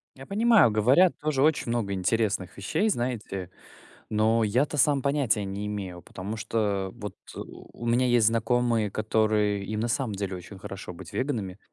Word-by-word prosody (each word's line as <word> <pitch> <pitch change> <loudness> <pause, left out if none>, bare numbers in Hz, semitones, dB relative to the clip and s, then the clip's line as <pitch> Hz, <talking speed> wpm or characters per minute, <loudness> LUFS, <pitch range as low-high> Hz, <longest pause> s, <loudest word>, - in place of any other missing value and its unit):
Я 135 - -11
понимаю, 215 - +4
говорят 130 - +4
тоже 150 -3 0
очень 155 -5 +2
много 115 -4 -1
интересных 100 0 -1
вещей, 200 - 0
знаете, 110 - -3 0.6
но 110 +1 +2
я-то 125 +8 +1
сам 140 0 +3
понятия 140 -7 +1
не 100 +1 -4
имею, 95 -4 -5
потому 100 +4 -6
что 100 -3 -1
вот, 105 0 -7 0.2
э, - - -6
у 120 - -10
меня 120 +2 +3
есть 120 -3 +4
знакомые, 115 -1 +1
которые, 110 -1 +1
им 110 +1 -3
на 115 - -1
самом 115 -2 -1
деле 100 -1 -3
очень 90 +2 -10
хорошо 95 -1 -7
быть 85 - -11
веганами, 110 -9 -2
110 Hz, 165 wpm, -27 LUFS, 100-125 Hz, 0.6 s, понимаю